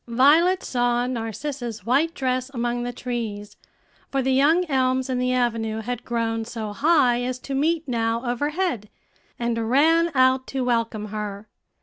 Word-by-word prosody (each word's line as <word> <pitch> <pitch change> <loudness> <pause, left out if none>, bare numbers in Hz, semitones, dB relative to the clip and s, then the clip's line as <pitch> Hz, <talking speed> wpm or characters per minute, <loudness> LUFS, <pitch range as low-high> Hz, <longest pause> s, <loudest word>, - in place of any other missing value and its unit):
Violet 305 +10 +4
saw 245 -1 0
Narcissa's 240 -1 -5
white 295 +8 +2
dress 255 -3 -1
among 240 0 -1
the 245 0 -3
trees, 230 -4 -5 0.5
for 270 -1 0
the 265 +1 +1
young 310 +7 +4
elms 260 -3 0
in 250 - 0
the 250 0 +1
avenue 225 -3 0
had 245 +1 -4
grown 225 -1 -1
so 220 -2 -6
high 255 -1 +3
as 250 0 -2
to 270 +2 -7
meet 315 +3 0
now 230 0 -1
overhead, 290 - -1 0.5
and 230 -1 -1
ran 325 +6 +4
out 260 0 +3
to 265 -1 -2
welcome 230 -3 -1
her. 210 0 -5
245 Hz, 150 wpm, -23 LUFS, 230-270 Hz, 0.5 s, Violet